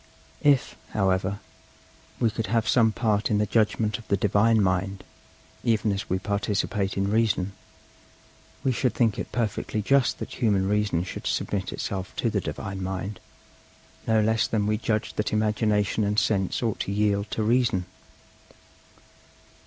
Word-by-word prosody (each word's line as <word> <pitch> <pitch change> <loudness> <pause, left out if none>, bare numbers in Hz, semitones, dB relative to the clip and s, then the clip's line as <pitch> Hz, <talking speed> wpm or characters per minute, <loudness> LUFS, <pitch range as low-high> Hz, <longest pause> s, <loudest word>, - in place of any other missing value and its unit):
If, 140 -3 +3 0.2
however, 95 -1 +1 0.8
we 115 - +2
could 115 0 -3
have 115 -1 +1
some 115 -3 +4
part 110 -2 0
in 105 - +2
the 105 - +2
judgment 110 0 +1
of 115 - -14
the 100 - +2
Divine 105 +2 +3
mind, 95 0 0 0.6
even 110 -2 +2
as 100 0 -3
we 95 - +1
participate 100 0 -1
in 100 +1 0
Reason, 105 -4 +1 1.1
we 130 - +2
should 125 0 0
think 115 -4 +2
it - - -5
perfectly 110 -2 -2
just 135 +5 +2
that - - -6
human 100 -5 +2
Reason 105 -4 +1
should 95 - -6
submit - - -1
itself 95 -2 -4
to - - 0
the - - 0
Divine 95 -1 -5
mind, 95 +2 -4 0.9
no 110 -1 +4
less 110 +1 +2
than 105 -2 0
we 105 +1 +1
judged 110 -2 -2
that 105 - 0
Imagination 105 -1 +1
and 105 +1 0
Sense 100 -1 +1
ought 115 -3 -1
to - - -2
yield 100 0 +1
to 110 - -2
Reason. 115 -4 +2
105 Hz, 155 wpm, -26 LUFS, 100-110 Hz, 1.1 s, some